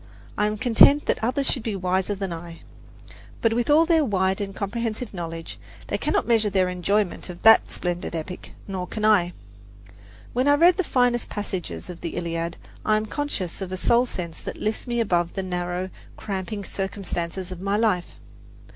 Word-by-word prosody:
I 210 Hz, -, +2 dB
am 210 Hz, 0 st, -2 dB
content 250 Hz, +6 st, +6 dB
that -, -, 0 dB
others 265 Hz, +4 st, +1 dB
should 255 Hz, -, +1 dB
be 215 Hz, -2 st, -3 dB
wiser 185 Hz, +2 st, 0 dB
than 195 Hz, -3 st, -3 dB
I. 165 Hz, 0 st, -9 dB, 0.8 s
But 225 Hz, -1 st, +2 dB
with 240 Hz, +3 st, 0 dB
all 310 Hz, +3 st, +6 dB
their 325 Hz, -2 st, +4 dB
wide 190 Hz, -5 st, +1 dB
and 195 Hz, -1 st, -4 dB
comprehensive 225 Hz, +2 st, -3 dB
knowledge, 165 Hz, -2 st, -6 dB, 0.3 s
they -, -, -1 dB
cannot -, -, 0 dB
measure 225 Hz, -3 st, +3 dB
their 190 Hz, -2 st, +2 dB
enjoyment 190 Hz, +2 st, 0 dB
of 175 Hz, -1 st, -9 dB
that 225 Hz, 0 st, +7 dB
splendid 175 Hz, -1 st, -3 dB
epic, 165 Hz, +3 st, -6 dB
nor 185 Hz, -2 st, -4 dB
can 215 Hz, +2 st, -3 dB
I. 180 Hz, -5 st, +4 dB, 1.0 s
When 255 Hz, +3 st, +1 dB
I 285 Hz, -, +6 dB
read 345 Hz, +4 st, +5 dB
the 375 Hz, -, +2 dB
finest 245 Hz, -5 st, +1 dB
passages 180 Hz, -, -5 dB
of 175 Hz, -1 st, -9 dB
the 170 Hz, -, -4 dB
Iliad, 170 Hz, 0 st, -3 dB, 0.3 s
I 215 Hz, 0 st, +3 dB
am 215 Hz, -, -1 dB
conscious 215 Hz, -, -3 dB
of 190 Hz, -1 st, -4 dB
a 185 Hz, -, -3 dB
soul 235 Hz, +6 st, +3 dB
sense 170 Hz, -7 st, -6 dB
that -, -, -6 dB
lifts 215 Hz, +3 st, -2 dB
me 240 Hz, 0 st, -1 dB
above 175 Hz, -6 st, +1 dB
the 195 Hz, -, -3 dB
narrow, 180 Hz, 0 st, -3 dB, 0.3 s
cramping 200 Hz, +1 st, -4 dB
circumstances 190 Hz, -2 st, -4 dB
of 180 Hz, -1 st, -7 dB
my 200 Hz, +1 st, +1 dB
life. 210 Hz, -6 st, +1 dB
195 Hz, 180 wpm, -24 LUFS, 180-225 Hz, 1.0 s, that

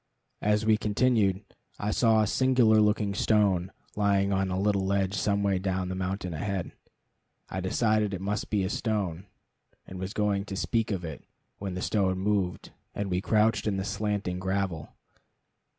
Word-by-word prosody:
As 105 Hz, +1 st, +2 dB
we 110 Hz, -1 st, +4 dB
continued, 105 Hz, -3 st, +1 dB, 0.3 s
I 105 Hz, 0 st, -2 dB
saw 110 Hz, -1 st, +4 dB
a -, -, +2 dB
singular 120 Hz, -2 st, +4 dB
looking 105 Hz, -1 st, +2 dB
stone 100 Hz, -4 st, +2 dB, 0.2 s
lying 100 Hz, -1 st, +2 dB
on 95 Hz, 0 st, 0 dB
a 90 Hz, -, -1 dB
little 100 Hz, -1 st, +1 dB
ledge 95 Hz, 0 st, 0 dB
some 100 Hz, 0 st, 0 dB
way 100 Hz, -2 st, +1 dB
down 95 Hz, -1 st, -2 dB
the -, -, -3 dB
mountain 95 Hz, -1 st, -3 dB
ahead. 95 Hz, +3 st, -3 dB, 0.8 s
I 95 Hz, -, -3 dB
decided 105 Hz, +2 st, +1 dB
it 95 Hz, -, -4 dB
must 100 Hz, +3 st, -3 dB
be 105 Hz, -3 st, +1 dB
a 95 Hz, -, -1 dB
stone, 100 Hz, -5 st, -2 dB, 0.6 s
and 95 Hz, -, -9 dB
was 95 Hz, +2 st, -4 dB
going 100 Hz, -2 st, 0 dB
to 100 Hz, -, -6 dB
speak 115 Hz, +3 st, 0 dB
of 95 Hz, -5 st, -2 dB
it, 80 Hz, -4 st, -7 dB, 0.4 s
when 95 Hz, -2 st, -4 dB
the 90 Hz, -, -4 dB
stone 95 Hz, -3 st, +1 dB
moved, 95 Hz, -2 st, -1 dB, 0.2 s
and 100 Hz, -2 st, -3 dB
we 90 Hz, +1 st, 0 dB
crouched 110 Hz, +1 st, +2 dB
in 100 Hz, -2 st, 0 dB
the 95 Hz, -, -2 dB
slanting 100 Hz, -3 st, -2 dB
gravel. 95 Hz, -4 st, -2 dB
100 Hz, 170 wpm, -28 LUFS, 95-105 Hz, 0.8 s, we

